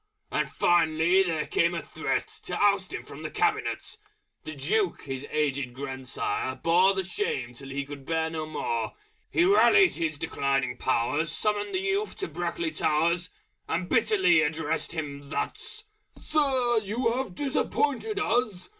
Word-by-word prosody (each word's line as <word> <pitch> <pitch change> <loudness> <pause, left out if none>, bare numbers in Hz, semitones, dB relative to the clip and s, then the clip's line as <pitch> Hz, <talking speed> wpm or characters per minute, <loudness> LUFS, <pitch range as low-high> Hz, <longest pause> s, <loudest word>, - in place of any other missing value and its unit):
And - - 0
finally 170 +1 +3
there 165 -5 0
came 170 +1 +1
a 170 - -2
Threat - - -2 0.2
To - - -2
oust 200 -2 +2
him - - -5
from - - -10
the - - -4
Cabinet! 430 0 -1 0.5
The 155 - -6
Duke 180 +7 0
his 135 0 -5
aged 140 -4 -1
grand 130 -1 -6
sire 130 +1 -1
bore 175 +7 +4
The 190 - 0
shame 140 -10 -2
till 135 +3 -8
he 140 +1 -3
could 140 -1 -9
bear 160 +2 0
no 155 -1 -4
more. 120 -7 -2 0.4
He 345 - +3
rallied 400 0 +6
his 160 -3 -2
declining 135 -5 -1
powers, 130 +6 0
Summoned 205 - -1
the 370 - +1
youth 400 +2 -1
to 390 - -3
Brackley 345 -2 -3
Towers, 170 - +1 0.4
And 175 +2 -1
bitterly 190 -7 +4
addressed 160 +1 -1
him 145 -3 -5
thus 435 - -4 0.3
"Sir! 260 -6 +2
you 230 +3 0
have 260 -9 -3
disappointed 290 +7 0
us! 220 - 0
170 Hz, 155 wpm, -27 LUFS, 145-230 Hz, 0.5 s, rallied